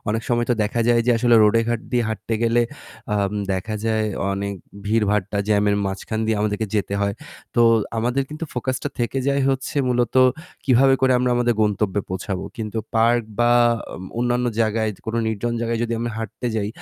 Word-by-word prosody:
অনেক 110 +2 0
সময় 120 -1 +1
তো - - +4
দেখা 110 +3 -1
যায় 120 -1 +4
যে - - +4
আসলে 120 0 +4
রোডে 105 +2 +4
ঘাট 120 -1 0
দিয়ে 120 -1 +2
হাঁটতে 110 +1 -3
গেলে 115 +1 +3 0.5
আম 100 0 0 0.2
দেখা 95 +4 -3
যায় 110 -1 +1 0.3
অনেক 100 +1 -3 0.3
ভিড়ভাট্টা, 105 -2 +1
জ্যামের 105 -1 +3
মাঝখান 95 +3 -3
দিয়ে 110 -1 +1
আমাদেরকে 105 +1 -1
যেতে 100 -1 0
হয়। 100 0 0 0.4
তো 120 - +4 0.4
আমাদের 125 +4 +1
কিন্তু 155 +2 -5
focus 130 +1 -1
টা - - -1
থেকে 120 +3 -1
যায় 140 0 +2
হচ্ছে 135 +2 -3
মূলত 120 -2 0 0.5
কিভাবে 135 +1 +5
করে 130 -1 +4
আমরা 125 0 +1
আমাদের 120 -1 +2
গন্তব্যে 105 -1 +1
পৌঁছাবো। 95 0 -4
কিন্তু 110 -1 -4 0.2
পার্ক 115 +1 +3 0.2
বা 120 0 +4 0.5
ম - - -8
অন্যান্য 120 0 +1
জায়গায় 110 0 +1 0.2
কোন 110 - -3
নির্জন 110 +2 -1
জায়গায় 115 0 -1
যদি 120 0 -2
আমরা 120 +1 -2
হাঁটতে 110 +2 -5
যাই 105 -2 -1
115 Hz, 180 wpm, -22 LUFS, 105-120 Hz, 0.5 s, কিভাবে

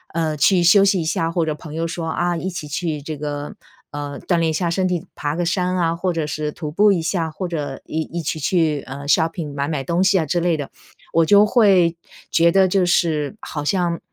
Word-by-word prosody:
呃， 160 -2 0
去 180 +3 +4
休 195 +4 +6
息 195 -2 +3
一 - - -3
下， 165 0 -1
或 165 -1 0
者 155 - -1
朋 150 0 -10
友 165 +1 -1
说， 165 0 -4
啊， 175 +1 0
一 185 +4 -3
起 170 -4 -6
去 150 0 -3
这 155 +1 -6
个 145 0 -5 0.4
呃， 145 -1 -6
锻 175 - +2
炼 165 -1 +1
一 - - -3
下 170 +2 -1
身 185 +1 +1
体， 175 -3 -2
爬 145 +1 -3
个 175 0 -1
山 180 +1 0
啊， 165 -1 +1
或 180 +2 -1
者 160 -2 -2
是 150 0 -3
徒 150 -1 -6
步 205 +5 +4
一 175 -4 +1
下， 165 -1 -1
或 185 +4 -4
者 145 -6 -4
一 160 - -3
一 170 +2 -5
起 155 - -2
去， 155 -2 +1
呃 140 +2 -7
shopping 160 -1 +1
买 140 0 -2
买 150 -4 -2
东 170 +6 0
西， 190 0 +4
啊， 160 - 0
之 165 +4 0
类 170 -2 +2
的， 145 - -5 0.4
我 165 0 +4
就 205 +4 +6
会 195 -7 +4 0.4
觉 170 0 +4
得 190 0 +4
就 185 0 +2
是 165 +1 0
好 150 -3 -5
像 170 0 0
165 Hz, 285 characters per minute, -20 LUFS, 150-180 Hz, 0.4 s, 休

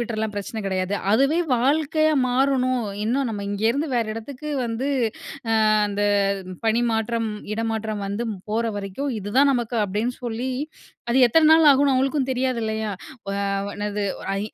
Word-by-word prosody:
விட்டுறலாம், 220 -2 -2
பிரச்சன 205 +2 -4
கெடையாது. 190 0 -1 0.2
அதுவே 275 +9 +3 0.2
வாழ்க்கையா 310 +5 +2 0.2
மாறணும். 255 -1 +2 0.2
இன்னும் 255 +3 0
நம்ம 205 -2 -4
இங்க 205 +1 -4
இருந்து 285 +6 -1
வேற 235 -2 +2
எடத்துக்கு 270 +6 -7 0.2
வந்து 235 +4 -2 0.8
அ - - +4 0.2
அந்த 205 0 -2 0.6
பணிமாற்றம், 225 0 +1 0.2
இடமாற்றம் 220 -1 -2
வந்து 205 +4 -3 0.3
போற 230 +2 0
வரைக்கும் 205 +8 -3
இது 205 +1 -6
தான் 280 +1 +6
நமக்கு 240 -2 -2
அப்படின்னு 210 +5 -2
சொல்லி 240 +2 -2 0.6
அது 250 +3 +3
எத்தன 310 +6 +4
நாள் 320 -1 +6
ஆகும்னு 280 0 +5
அவங்களுக்கும் 265 +1 +1
தெரியாது 255 -1 0
இல்லையா? 220 0 -2 0.4
அ, - - -2 0.4
என்னது, 205 0 -3 0.4
ஐ - - -2
235 Hz, 145 wpm, -23 LUFS, 215-265 Hz, 0.8 s, தான்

